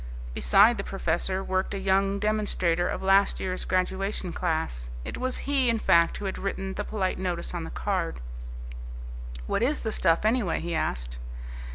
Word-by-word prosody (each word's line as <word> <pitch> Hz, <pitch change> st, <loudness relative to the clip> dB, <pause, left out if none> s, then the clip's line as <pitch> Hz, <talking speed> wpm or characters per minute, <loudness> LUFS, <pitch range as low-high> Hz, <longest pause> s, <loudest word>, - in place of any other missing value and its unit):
Beside 205 Hz, -, +5 dB
the -, -, -1 dB
professor 190 Hz, +1 st, -1 dB
worked 190 Hz, +1 st, -1 dB
a -, -, -1 dB
young 195 Hz, +1 st, +2 dB
demonstrator 200 Hz, -5 st, +1 dB
of -, -, -3 dB
last 195 Hz, +1 st, +4 dB
year's 185 Hz, -1 st, -2 dB
graduation 185 Hz, 0 st, -1 dB
class. 160 Hz, -, -1 dB, 0.2 s
It -, -, -4 dB
was 255 Hz, 0 st, -1 dB
he, 275 Hz, -3 st, +2 dB
in 230 Hz, -, +3 dB
fact, 170 Hz, -5 st, +4 dB
who 205 Hz, -, -5 dB
had 190 Hz, -, -3 dB
written 195 Hz, -1 st, -3 dB
the -, -, -3 dB
polite 190 Hz, -4 st, -1 dB
notice 180 Hz, -2 st, -2 dB
on 170 Hz, -2 st, -3 dB
the -, -, -6 dB
card. 185 Hz, -, -1 dB, 1.3 s
"What 200 Hz, -, 0 dB
is 280 Hz, +6 st, +2 dB
the 220 Hz, -, -2 dB
stuff, 165 Hz, -1 st, +2 dB
anyway?" 220 Hz, -5 st, +2 dB
he 170 Hz, 0 st, -3 dB
asked. -, -, -2 dB
190 Hz, 170 wpm, -27 LUFS, 170-205 Hz, 1.3 s, Beside